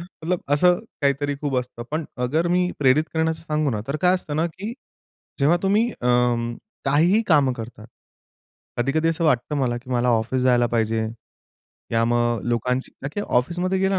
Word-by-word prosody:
मतलब 175 0 -4
असं 180 +4 +4 0.2
काहीतरी 140 +1 +1
खूप 140 -3 -1
असतं. 125 -1 -6
पण 155 +2 -2 0.2
अगर 160 +7 +1
मी 180 +1 +2
प्रेरित 145 +2 +4
करण्याचं 160 0 0
सांगू 150 -3 0
ना, 105 - -2
तर 140 - -1
काय 180 0 +5
असतं 155 -5 -3
ना 160 +2 +2
की 195 +6 -6 0.7
जेव्हा 150 +5 +4
तुम्ही 205 +4 +3
अं, 120 - +1 0.3
काहीही 165 +10 +3
कामं 145 -5 +4
करता. 115 -2 -8 0.9
कधी-कधी 150 +6 +1
असं 165 +1 0
वाटतं 150 -1 +1
मला 125 -3 0
की 125 +1 -13
मला 125 0 +1
ऑफिस 120 +2 +1
जायला 125 -1 +4
पाहिजे, 115 -1 0 0.9
या 115 0 +3
मग 120 0 +1
लोकांची 125 +2 -1
का 140 - -2
की 205 - -2 0.2
ऑफिसमध्ये 175 +8 -1
गेला 190 0 +1
140 Hz, 165 wpm, -23 LUFS, 120-165 Hz, 0.9 s, काय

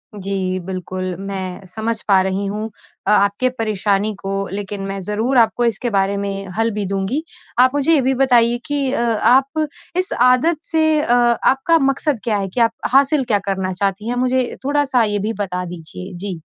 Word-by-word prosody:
जी 190 -1 -2
बिल्कुल 185 -1 -4
मैं 190 -1 -5
समझ 220 +4 -2
पा 195 -2 +5
रही 190 +1 -2
हूँ 210 +2 -3 0.4
अ, - - +4
आपके 205 +5 +3
परेशानी 215 -3 -1
को 195 0 -5 0.2
लेकिन 200 0 -4
मैं 195 0 -4
ज़रूर 220 +7 -1
आपको 235 +1 +3
इसके 235 +1 0
बारे 195 -1 +1
में 195 0 -4
हल 225 0 +2
भी 205 -1 -3
दूँगी। 195 - -2 0.4
आप 255 +1 +6
मुझे 290 +3 +3
ये 290 - +4
भी 265 +1 +1
बताइए 240 -2 +4
कि 285 -3 -1
अ, 265 - 0
आप 265 +6 +2 0.3
इस 370 0 0
आदत 255 +7 +4
से 315 -1 +3
अ, 240 - +2
आपका 245 +6 +3
मक़सद 275 -1 0
क्या 215 -3 0
है, 195 - -2
कि 190 +6 -5
आप 230 -1 +4 0.2
हासिल 275 +1 +4
क्या 210 -4 +2
करना 190 -1 -1
चाहती 200 +3 -1
हैं? 245 - -1
मुझे 255 0 0
थोड़ा-सा 280 -4 +2
ये 205 -1 0
भी - - -2
बता 180 -1 -4
दीजिए। 180 +2 -8
जी। 185 -2 -5
220 Hz, 185 wpm, -19 LUFS, 195-255 Hz, 0.4 s, आप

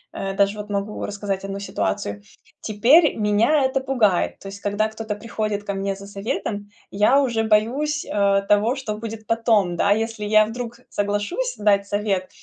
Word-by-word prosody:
э- 195 0 -3
даже 200 +1 +2
вот 210 0 -7
могу 205 +1 -3
рассказать 200 -1 -4
1 195 0 -4
ситуацию- 100 - -3 0.4
теперь 255 +10 +4
меня 225 +7 +3
это 265 +1 +1
пугает. 235 -9 +1
То - - -10
есть 200 +1 -9
когда 205 +2 0
кто-то 220 -1 -5
приходит 215 -1 -3
ко 200 - -3
мне 195 0 -2
за 195 +1 -11
советом, 205 0 -4 0.2
я 210 +7 +4
уже 235 -5 +1
боюсь, 250 +8 +1
э, 200 -1 +2
того, 210 +4 +3
что 225 -6 -4
будет 220 0 -7
потом. 220 -5 +2
Да, 200 - +1
если 220 0 -1
я 215 +1 +5
вдруг 235 +2 -6
соглашусь 205 - -2
дать 200 -1 +2
совет, 200 -2 -1
210 Hz, 170 wpm, -22 LUFS, 200-230 Hz, 0.4 s, я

